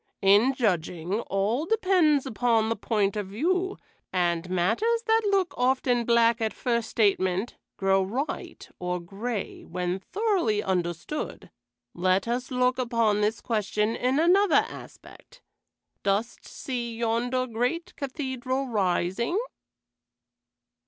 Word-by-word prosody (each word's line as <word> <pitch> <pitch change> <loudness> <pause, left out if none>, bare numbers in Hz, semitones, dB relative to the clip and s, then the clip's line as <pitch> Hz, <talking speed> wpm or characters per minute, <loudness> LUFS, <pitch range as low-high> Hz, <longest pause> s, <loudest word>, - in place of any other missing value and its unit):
In 205 +7 +5
judging, 180 -4 -1
all 215 - 0
depends 360 -9 +3
upon 230 -2 +1
the 230 - 0
point 210 -4 0
of 205 -2 -3
view, 360 - -1 0.3
and 175 -1 0
matters 425 - +1
that 450 0 +3
look 390 -3 +1
often 250 -1 +1
black 235 0 +3
at 220 -1 0
first 235 -2 -1
statement 195 -1 +1 0.2
grow 195 0 +3
white 240 +10 -4
or 180 0 -2
gray 200 +5 -5
when 180 +2 -3
thoroughly 355 - 0
understood. 175 - -3 0.4
Let 185 +3 +1
us 245 +2 -2
look 250 0 +1
upon 230 -4 +1
this 210 +1 0
question 215 0 0
in 255 +2 0
another 365 +3 +4
aspect. - - -13 0.6
Dost 200 +4 -1
see 240 -3 -5
yonder 235 +2 0
great 250 +10 -2
cathedral 260 -1 -3
rising?" 200 - 0
230 Hz, 115 wpm, -26 LUFS, 195-265 Hz, 0.6 s, In